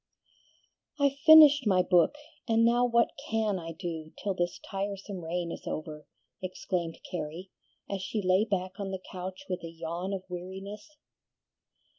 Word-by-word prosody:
"I'VE 280 0 +2
finished 295 -5 +9
my 185 -2 +4
book, 180 - +4 0.3
and 225 0 +4
now 240 +1 +4
what 235 -1 +3 0.2
CAN 220 -3 +1
I 165 -1 -6
do 165 -2 -6
till 200 - -2
this 175 -1 -2
tiresome 195 -2 -4
rain 170 +1 -2
is - - -8
over?" 155 -1 -5 0.3
exclaimed 180 -2 -3
Carrie, 175 +2 -5 0.4
as 195 -1 -3
she 215 +3 -2
lay 185 +3 +4
back 190 -3 -2
on 200 -1 -3
the 190 - -3
couch 185 +7 -6
with 180 -1 -4
a 165 - -5
yawn 170 +3 -4
of 195 -2 -3
weariness. 195 +9 -8
190 Hz, 150 wpm, -29 LUFS, 175-210 Hz, 0.4 s, finished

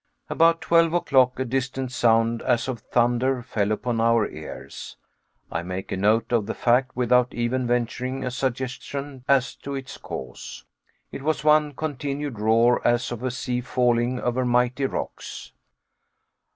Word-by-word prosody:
About 165 0 +4
twelve 165 0 +3
o'clock 130 -7 +3
a 130 - -1
distant 130 0 -2
sound 115 -1 +2
as 120 +1 +1
of 130 -3 -3
thunder 120 +3 +1
fell 105 -4 -1
upon 115 +1 -1
our 115 -1 +3
ears. 70 -3 -9 0.5
I 80 - -2
make 90 +2 -6
a - - 0
note 105 +5 +2
of 115 -4 +1
the - - -3
fact 125 +2 +2
without 125 0 +3
even 120 +1 -1
venturing 125 +2 -1
a 125 - -2
suggestion 130 +1 -4
as 135 -2 +3
to 140 0 -6
its 135 -1 -7
cause. 65 -2 -8 0.5
It - - -7
was 150 0 -1
one 150 -1 +4
continued 145 -4 -4
roar 115 +3 +3
as 120 0 +1
of 120 -2 -5
a 130 - -1
sea 125 0 -3
falling 125 0 +1
over 125 +1 0
mighty 125 +2 +1
rocks. - - -6
125 Hz, 150 wpm, -24 LUFS, 120-135 Hz, 0.5 s, About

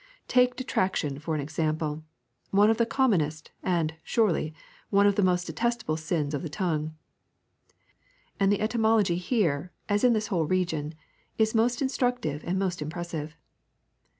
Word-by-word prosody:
Take 250 -1 +3
detraction 185 - -1
for 160 +1 -2
an 150 - -1
example, 155 +1 -2 0.5
one 205 +2 +5
of 225 - +1
the 230 -1 +2
commonest, 170 - +1
and, 165 -4 0
surely, 190 -8 +1 0.4
one 200 0 +4
of 205 - +5
the 205 - +1
most 180 -2 +2
detestable 235 -6 -1
of 155 - -2
the 160 - -12
sins 150 -4 0
of 145 - -2
the 165 - -5
tongue. 155 -2 -2 1.4
And 195 0 +4
the 205 - +1
etymology 220 -5 +2
here, 180 - 0 0.2
as 205 0 +1
in 250 -1 +6
this 215 0 -1
whole 165 -4 +1
region, 160 -4 -1 0.4
is 220 -1 +2
most 235 +3 +2
instructive 245 - -1
and 180 +2 -1
most 185 -4 -1
impressive. 160 -1 -5
180 Hz, 155 wpm, -27 LUFS, 155-220 Hz, 1.4 s, in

